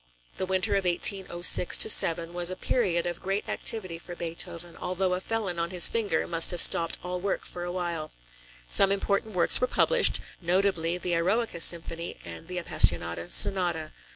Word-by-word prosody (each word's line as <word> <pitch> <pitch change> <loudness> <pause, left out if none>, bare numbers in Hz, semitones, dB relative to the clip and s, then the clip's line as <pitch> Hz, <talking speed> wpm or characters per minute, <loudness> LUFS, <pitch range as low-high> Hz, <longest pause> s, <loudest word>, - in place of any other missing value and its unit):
The 185 - -5
winter 185 -1 +1
of 195 - -4
1806 180 0 +2
7 165 0 +3
was 175 0 -2
a 185 - -6
period 185 -5 -2
of 175 -1 -6
great 195 +2 -4
activity 185 -7 -4
for 175 +1 -11
Beethoven, 170 0 -6
although 185 0 -3
a 180 - -4
felon 200 -5 -4
on 170 0 -3
his 180 -2 +5
finger 205 -8 -2
must 165 -1 +2
have 175 - -1
stopped 165 0 +5
all 180 0 -6
work 200 +1 -4
for 175 - -9
a 175 - -6
while. 170 -3 -5 0.6
Some 195 - +2
important 200 +1 -3
works 175 - +3
were 255 - +1
published, - - +2 0.2
notably 175 -1 -1
the 180 0 -4
Eroica 180 +2 -2
Symphony 170 0 +1
and 165 - -11
the 180 0 -7
Appassionata 85 - +1
Sonata. 175 -5 +3
175 Hz, 170 wpm, -25 LUFS, 170-190 Hz, 0.6 s, his